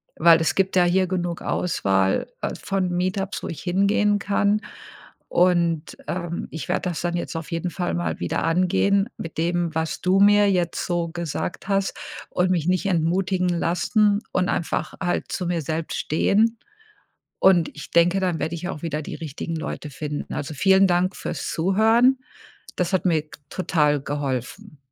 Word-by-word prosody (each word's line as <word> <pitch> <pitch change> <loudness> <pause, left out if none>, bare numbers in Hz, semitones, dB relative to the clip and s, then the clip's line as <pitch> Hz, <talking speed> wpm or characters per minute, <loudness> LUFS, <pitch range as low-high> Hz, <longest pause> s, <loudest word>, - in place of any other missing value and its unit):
weil 165 0 +6
es 160 -1 +1
gibt 190 -1 +1
ja 180 - +5
hier 185 +1 +2
genug 175 -2 -2
Auswahl, 95 - 0
äh, - - -2
von 190 -2 -1
Meetups, 185 +2 -2
wo - - -3
ich 165 - -6
hingehen 200 +3 +2
kann. 205 +2 +1 0.7
Und, 170 -3 +2
ähm, 175 -1 -3
ich 160 0 -6
werde 180 0 0
das 170 - -4
dann 175 0 -1
jetzt 170 -1 -4
auf 165 -1 -5
jeden 170 +1 -2
Fall 180 0 -3
mal 85 -1 -2
wieder 85 - -2
angehen 190 +5 +2
mit 165 - -7
dem, 170 0 0
was 160 0 -2
du 185 +2 +3
mir 205 0 +6
jetzt 175 -3 0
so 170 -1 -1
gesagt 170 +2 -4
hast 195 -1 0 0.4
und 180 0 +1
mich 170 -4 +1
nicht 185 +2 +1
entmutigen 180 +1 +1
lassen 205 +5 +2
und 185 -1 0
einfach 165 - -2
halt 175 - -1
zu 180 - -2
mir 170 -2 -1
selbst 160 +2 -3
stehen. 220 +8 +2 0.8
Und 175 -4 +4
ich 150 - -9
denke, 175 +3 +4
dann 180 -3 0
werde 160 +2 -2
ich 175 +2 -5
auch 155 - -6
wieder 155 -2 -3
die - - -7
richtigen 160 +1 -5
Leute 155 -1 -5
finden. 145 +1 -5
Also, 145 +2 -4
vielen 190 +5 +4
Dank 180 +2 +1
fürs - - -4
Zuhören. 225 +9 +3 0.6
Das 180 +1 -1
hat 190 - +1
mir 160 -4 +2 0.3
total 150 -6 +1
geholfen. 145 - -4
175 Hz, 170 wpm, -23 LUFS, 160-190 Hz, 0.8 s, weil